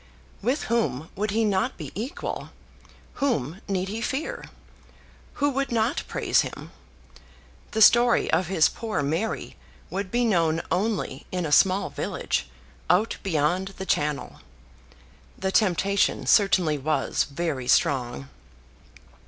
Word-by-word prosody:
With 255 +8 0
whom 215 - -1
would 210 +3 -1
he 220 +2 +1
not 205 +5 0
be - - -7
equal? 235 +7 -5 0.7
Whom 190 - -1
need 190 -2 -1
he 220 +3 -4
fear? 310 - -3 0.9
Who 285 0 +1
would 275 0 -2
not 230 +2 +1
praise - - +2
him? - - -7 1.0
The 220 -1 +4
story 240 +2 +5
of 180 - +2
his 165 -4 +4
poor 220 -10 -3
Mary 165 +10 -2 0.3
would 195 0 -3
be 240 +3 +1
known 165 -6 +2
only 205 +3 -1
in 180 -2 -2
a 150 - -3
small 190 +5 +4
village, - - -2 0.4
out 205 +6 +2
beyond 180 +3 0
the 190 - -5
Channel. 150 - -1 1.0
The 190 0 -2
temptation 200 -1 +2
certainly 180 -7 +3
was 155 +3 0
very 140 -4 -3
strong. 120 - +1
190 Hz, 125 wpm, -25 LUFS, 160-225 Hz, 1.0 s, story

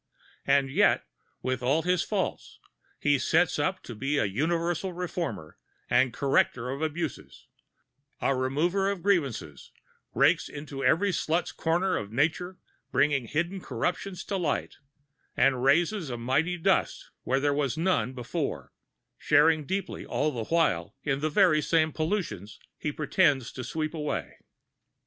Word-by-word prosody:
And 135 -1 +3
yet, 200 +9 +3 0.4
with 130 0 -1
all 140 +6 +2
his 180 -1 +2
faults, - - -3 0.4
he 145 -2 +2
sets 165 +3 +2
up 185 +6 -1
to 120 - -8
be 135 +7 -1
a - - +2
universal 170 - -1
reformer 170 - -5 0.3
and 130 -1 +4
corrector 125 -1 +1
of 140 +3 -5
abuses, 160 -2 -4 0.7
a 135 - +1
remover 165 +10 +1
of 200 -4 -4
grievances, 135 - -1 0.5
rakes - - +3
into 145 -2 -7
every 200 +4 +3
slut's 165 0 0
corner 175 +3 0
of 105 0 -5
nature, 160 +8 0 0.3
bringing 140 -4 +2
hidden 170 +7 -2
corruptions 180 +9 -3
to - - -20
the 195 - 0
light, 160 -5 -2 0.6
and 130 -1 +3
raises 170 +5 +2
a 120 - -4
mighty 140 +9 0
dust 165 - 0
where 135 +1 0
there 145 +1 +1
was 140 -3 -1
none 165 -6 +1
before, 125 -2 -4 0.5
sharing 155 +1 +4
deeply 195 +1 -3
all 155 - -1
the 115 -5 -4
while 135 - +1
in 135 -2 0
the 155 +2 0
very 155 -3 +4
same 160 0 +2
pollutions 155 - -3 0.2
he 150 - -2
pretends 145 -4 +1
to 130 - -6
sweep 155 +6 -3
away. 150 -2 -4
150 Hz, 145 wpm, -28 LUFS, 130-175 Hz, 0.7 s, and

